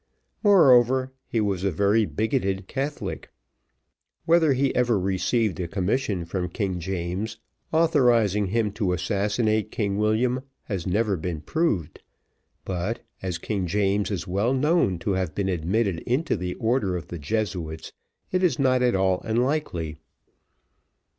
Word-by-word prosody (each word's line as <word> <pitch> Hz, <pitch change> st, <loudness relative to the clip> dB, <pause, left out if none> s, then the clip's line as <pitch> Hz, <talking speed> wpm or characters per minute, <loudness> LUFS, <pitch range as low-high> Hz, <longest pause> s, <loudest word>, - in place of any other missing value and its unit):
Moreover, 130 Hz, -, +5 dB
he 115 Hz, -, -1 dB
was 100 Hz, -3 st, 0 dB
a 100 Hz, -, +2 dB
very 100 Hz, +5 st, +2 dB
bigoted 100 Hz, -4 st, -1 dB
Catholic. 140 Hz, +2 st, -4 dB, 1.0 s
Whether 165 Hz, -3 st, +4 dB
he 135 Hz, +1 st, +1 dB
ever 120 Hz, -3 st, +3 dB
received 95 Hz, +3 st, 0 dB
a 90 Hz, -, -2 dB
commission 100 Hz, 0 st, -1 dB
from 90 Hz, +1 st, -3 dB
King 95 Hz, -1 st, -2 dB
James, 90 Hz, +4 st, -3 dB, 0.3 s
authorising 120 Hz, -, +3 dB
him 105 Hz, +1 st, 0 dB
to 100 Hz, -3 st, -1 dB
assassinate 105 Hz, +4 st, 0 dB
King 100 Hz, -2 st, -1 dB
William, 120 Hz, +4 st, +1 dB, 0.2 s
has 95 Hz, -6 st, -4 dB
never 105 Hz, +2 st, +1 dB
been 80 Hz, -1 st, -4 dB
proved; 135 Hz, -, -1 dB, 0.6 s
but, 95 Hz, +5 st, -3 dB, 0.2 s
as 90 Hz, -2 st, -3 dB
King 95 Hz, +1 st, -2 dB
James 100 Hz, +2 st, +1 dB
is 90 Hz, -5 st, -3 dB
well 100 Hz, +8 st, +1 dB
known 145 Hz, -, +2 dB
to 85 Hz, +4 st, -2 dB
have 95 Hz, -4 st, -1 dB
been 100 Hz, -1 st, -1 dB
admitted 95 Hz, +2 st, 0 dB
into 140 Hz, +7 st, +1 dB
the 90 Hz, +1 st, -4 dB
order 110 Hz, -6 st, 0 dB
of 85 Hz, -, -9 dB
the 85 Hz, -, -6 dB
Jesuits, 85 Hz, -1 st, -3 dB, 0.4 s
it 185 Hz, -, +1 dB
is 175 Hz, -9 st, +2 dB
not 130 Hz, -2 st, +3 dB
at 125 Hz, -4 st, +3 dB
all 95 Hz, -1 st, +2 dB
unlikely. 110 Hz, -, -1 dB
105 Hz, 140 wpm, -25 LUFS, 90-125 Hz, 1.0 s, Moreover